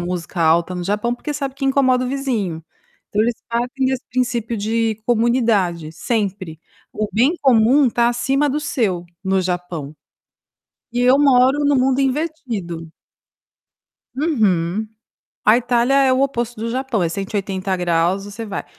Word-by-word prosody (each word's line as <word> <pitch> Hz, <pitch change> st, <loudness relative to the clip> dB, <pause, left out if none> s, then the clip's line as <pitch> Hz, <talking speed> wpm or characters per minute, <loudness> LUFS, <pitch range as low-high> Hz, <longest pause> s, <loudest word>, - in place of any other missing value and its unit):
música 175 Hz, 0 st, -4 dB
alta 165 Hz, +2 st, +3 dB
no 180 Hz, -, -4 dB
Japão 210 Hz, +5 st, -1 dB
porque 295 Hz, +4 st, -5 dB
sabe 275 Hz, -2 st, -3 dB
que 275 Hz, -, -5 dB
incomoda 260 Hz, -2 st, +3 dB
o -, -, -3 dB
vizinho. 225 Hz, -, -2 dB, 0.4 s
Então 210 Hz, -, +1 dB
eles 235 Hz, +1 st, 0 dB
partem 245 Hz, +3 st, -1 dB
desse 260 Hz, -1 st, -2 dB
princípio 240 Hz, -2 st, -1 dB
de 220 Hz, +2 st, 0 dB
comunidade, 225 Hz, -9 st, +1 dB
sempre. 190 Hz, -3 st, -3 dB, 0.3 s
O 215 Hz, -1 st, -2 dB
bem 260 Hz, +10 st, +2 dB
comum 255 Hz, +1 st, +4 dB
tá 235 Hz, +1 st, +2 dB
acima 270 Hz, +4 st, +1 dB
do 285 Hz, +2 st, -1 dB
seu 220 Hz, -12 st, -1 dB, 0.2 s
no 190 Hz, 0 st, +1 dB
Japão. 175 Hz, -5 st, -4 dB, 1.0 s
E 245 Hz, -, -1 dB
eu 255 Hz, +2 st, +5 dB
moro 275 Hz, 0 st, +4 dB
no 285 Hz, 0 st, +3 dB
mundo 260 Hz, +1 st, +2 dB
invertido. 255 Hz, -, -3 dB, 1.3 s
Uhum. 215 Hz, -, 0 dB, 0.6 s
A 215 Hz, +2 st, +6 dB
Itália 245 Hz, +1 st, +1 dB
é 270 Hz, -1 st, +4 dB
o 260 Hz, -, +1 dB
oposto 240 Hz, -4 st, -2 dB
do 230 Hz, +1 st, -3 dB
Japão; 255 Hz, -3 st, -1 dB
é 165 Hz, -, 0 dB
180º 190 Hz, -1 st, -1 dB
você 205 Hz, +3 st, -7 dB
vai. 200 Hz, -2 st, -5 dB
230 Hz, 145 wpm, -20 LUFS, 190-260 Hz, 1.3 s, A